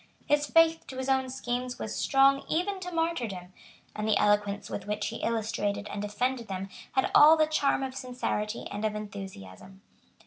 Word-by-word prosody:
His 295 0 +2
faith 330 +1 +4
to 260 - -8
his 260 +1 -3
own 265 -1 +2
schemes 250 -1 -3
was 215 - -5
strong 275 0 +4
even 380 +4 0
to 360 -1 -6
martyrdom; 240 - -2 0.4
and 215 0 -2
the 215 -2 +3
eloquence 205 0 +1
with - - -6
which 210 0 -2
he 230 - -6
illustrated 220 -3 -2
and 205 - -4
defended 235 +4 -2
them 195 0 -5 0.2
had 265 - +1
all 310 +2 +8
the 310 - +4
charm 290 -3 +1
of 265 -1 -4
sincerity 245 -4 -3
and 205 +1 -4
of 215 -1 0
enthusiasm. 195 - -9
240 Hz, 175 wpm, -28 LUFS, 205-275 Hz, 0.4 s, all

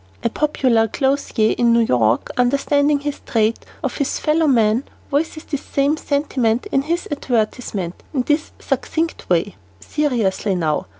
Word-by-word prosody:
'" - - -30
A 235 - +1
popular 255 -7 +2
clothier 265 -3 +1
in 235 -1 +4
New 235 - +4
York, 120 - +2
understanding 285 +3 +2
this 285 0 -4
trait 225 0 0 0.2
of - - -2
his 280 - -1
fellow 310 +1 +2
men, 230 -2 +3 0.3
voices 310 +2 -1
this 285 -3 -4
same 280 +2 +1
sentiment 270 - 0
in 270 - +3
his 335 +5 -2
advertisement 220 -8 -2
in 265 -5 0
this 300 +4 0
succinct 330 +1 -2
way: 180 +3 +1 0.3
"Seriously 220 - 0
now. 155 - -1
255 Hz, 145 wpm, -20 LUFS, 220-290 Hz, 0.3 s, in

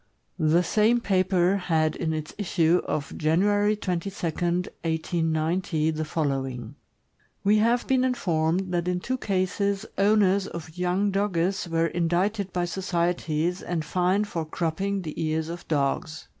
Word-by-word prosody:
The 160 +2 +3
same 220 +6 +3
paper 185 -2 +2
had 160 -4 +1
in 160 -2 -2
its 155 -1 -4
issue 175 -3 +2
of 145 -2 -3
January 205 +7 +2
22, 185 -2 -2
1890, 165 -1 -1
the 155 0 -2
following: 135 -6 -2 0.7
We 210 +2 +4
have 235 +3 +2
been 260 -1 +2
informed 180 -6 0
that 175 0 0
in 180 0 0
two 255 +7 -3
cases 200 +1 0
owners 200 -1 +3
of 160 -1 -8
young 180 +3 +1
Dogges 190 -2 0
were 165 0 +2
indicted 180 +4 0
by 175 -1 0
societies 175 -2 -1
and 170 -3 -3
fined 185 +6 +1
for 170 -5 -3
cropping 180 +5 -2
the 155 0 -4
ears 160 0 -1
of 175 +1 -7
dogs. 155 +2 -1
175 Hz, 135 wpm, -26 LUFS, 160-195 Hz, 0.7 s, We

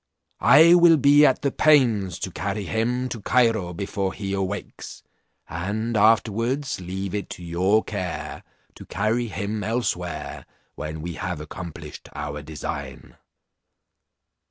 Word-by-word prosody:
I 165 +3 +7
will 170 -2 +7
be 145 +1 +6
at 130 - 0
the 140 - +1
pains 120 - +3
to - - -3
carry 105 - -3
him 120 +6 -1
to 115 - -6
Cairo 115 -7 +2
before 95 +1 -3
he 100 -2 -4
awakes, 100 +1 -5 0.4
and 105 +7 -3
afterwards 115 +5 +2
leave 95 +2 -5
it 105 -1 -3
to 90 - -8
your 95 +6 +2
care 95 -5 -5 0.3
to - - -12
carry 110 +4 0
him 100 +2 -4
elsewhere, 100 -7 -3 0.3
when 75 0 -6
we 85 0 -4
have 90 -1 -4
accomplished 80 0 -9
our 75 0 -5
design." 75 0 -7
100 Hz, 130 wpm, -24 LUFS, 90-120 Hz, 0.4 s, I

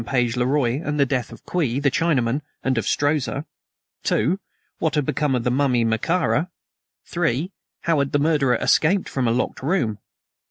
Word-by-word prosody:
Page 120 -3 +1
le 125 0 +1
Roi 135 -1 +1
and 150 0 -2
the 140 - +5
death 125 -3 -2
of - - -13
Kwee, 145 -9 0
the 140 -1 +2
Chinaman, 140 -5 +1 0.2
and 130 -1 +1
of 110 - -4
Strozza? 145 0 0 0.6
(2) 160 - +1 0.4
What 160 -1 0
had 150 -2 +1
become 145 -1 0
of 120 - -1
the 125 - +1
mummy 125 -2 +2
of 115 - +1
Mekara? 165 +7 +1 0.6
(3) 170 0 -1 0.3
How 165 -3 +1
had 140 -1 0
the - - +2
murderer 145 -4 +2
escaped 165 +8 +2
from 130 -3 -1
a - - +3
locked 125 +2 -1
room? 130 - 0
140 Hz, 185 wpm, -22 LUFS, 125-155 Hz, 0.6 s, the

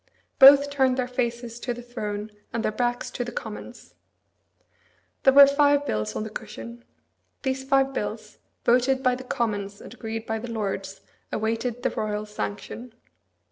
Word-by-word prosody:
Both 280 +1 +9
turned 265 -2 +2
their 255 -1 0
faces 240 -1 -3
to 245 0 -3
the 245 - -9
throne, 210 -3 -5 0.2
and 230 - -2
their - - +1
backs 240 +2 -1
to 245 - -3
the 240 - -6
Commons. 225 +2 -8 1.3
There 270 - +5
were 280 0 +11
five 285 0 +3
bills 105 - -2
on - - -2
the 220 - -7
cushion. 235 +2 -8 0.6
These 265 -1 -1
five 270 0 +2
bills, 215 -2 -5 0.3
voted 255 +2 +3
by 255 -1 +4
the 255 +1 -5
Commons 205 -6 -2
and - - -11
agreed 225 -2 -5
to - - -24
by 225 0 -2
the 240 +2 -7
Lords, 195 -3 -4 0.3
awaited 225 +2 -2
the - - +1
royal 210 0 -2
sanction. 215 +3 -6
240 Hz, 165 wpm, -25 LUFS, 215-260 Hz, 1.3 s, were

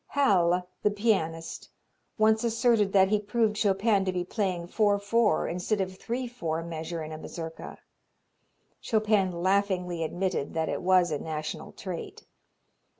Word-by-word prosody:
Halle, 180 -10 +2
the - - +3
pianist, 190 -7 -1 0.5
once 220 +1 +3
asserted 230 -3 +2
that 190 -1 +5
he 210 0 +2
proved 210 +1 0
Chopin 200 0 +2
to 185 - 0
be 180 -1 -2
playing 185 -3 -2
four 205 +2 +2
four 210 +2 +2
instead 180 +5 -1
of 190 -1 -2
three 245 +6 -4
four 165 -9 -3
measure 165 0 -5
in 155 - -7
a 155 - -6
mazurka. 165 0 -7 1.0
Chopin 215 -4 +2
laughingly 180 -1 0
admitted 175 -2 -2
that 160 0 0
it - - -2
was 180 -2 +4
a 150 - -1
national 155 0 -5
trait. 180 -3 -7
190 Hz, 145 wpm, -28 LUFS, 170-215 Hz, 1.0 s, that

